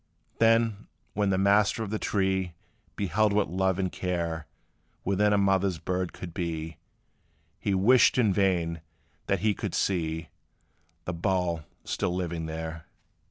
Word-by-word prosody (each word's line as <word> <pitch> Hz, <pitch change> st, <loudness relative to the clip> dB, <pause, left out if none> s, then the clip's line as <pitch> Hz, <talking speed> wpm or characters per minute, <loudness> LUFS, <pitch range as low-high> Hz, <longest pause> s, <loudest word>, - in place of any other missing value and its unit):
Then, 115 Hz, -2 st, +3 dB, 0.3 s
when 105 Hz, -1 st, +1 dB
the 95 Hz, -, +2 dB
master 100 Hz, +3 st, +3 dB
of 105 Hz, -, -5 dB
the 110 Hz, -, -1 dB
tree 95 Hz, -3 st, 0 dB, 0.4 s
Beheld 105 Hz, +2 st, +1 dB
what 105 Hz, -4 st, +1 dB
love 95 Hz, 0 st, +1 dB
and 95 Hz, -2 st, -1 dB
care 85 Hz, -3 st, -3 dB, 0.6 s
Within 100 Hz, +2 st, +2 dB
a 105 Hz, -, +4 dB
mother 95 Hz, -1 st, +3 dB
bird 90 Hz, -1 st, -1 dB
could 85 Hz, -3 st, -8 dB
be, 80 Hz, -3 st, -4 dB, 0.8 s
He 100 Hz, -, 0 dB
wished 120 Hz, +9 st, +5 dB
in 110 Hz, -6 st, +4 dB
vain 85 Hz, -4 st, +1 dB, 0.5 s
that -, -, +1 dB
he 105 Hz, 0 st, +3 dB
could -, -, -4 dB
see 80 Hz, -3 st, -1 dB, 0.8 s
The 90 Hz, -, -2 dB
bough 85 Hz, -3 st, -1 dB, 0.2 s
still 90 Hz, -, -1 dB
living 85 Hz, -3 st, -3 dB
there. 80 Hz, 0 st, -6 dB
95 Hz, 140 wpm, -28 LUFS, 85-100 Hz, 0.8 s, wished